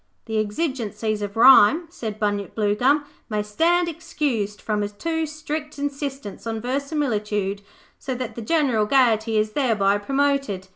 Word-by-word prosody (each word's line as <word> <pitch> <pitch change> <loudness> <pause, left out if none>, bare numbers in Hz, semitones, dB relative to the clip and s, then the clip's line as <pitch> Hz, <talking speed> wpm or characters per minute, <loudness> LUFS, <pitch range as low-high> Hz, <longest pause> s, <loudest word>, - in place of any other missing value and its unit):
'The 220 -1 -1
exigencies 215 -3 -2
of 205 +1 -5
rhyme,' 265 +6 +7
said 220 - -6
Bunyip 205 -3 -2
Bluegum, 245 +8 +2 0.2
'may 210 -1 -1
stand 335 +12 +2
excused 295 -11 -2
from 210 -1 -2
a 205 - -2
too 320 +9 -2
strict 305 0 -5
insistence 280 -6 -5
on 225 -1 -2
verisimilitude, 220 -7 -2 0.4
so 260 -2 -4
that 250 -2 -5
the 235 - -7
general 250 -6 +1
gaiety 225 -4 +3
is 215 0 +1
thereby 215 -7 +2
promoted. 275 -5 -1
230 Hz, 140 wpm, -23 LUFS, 210-285 Hz, 0.4 s, rhyme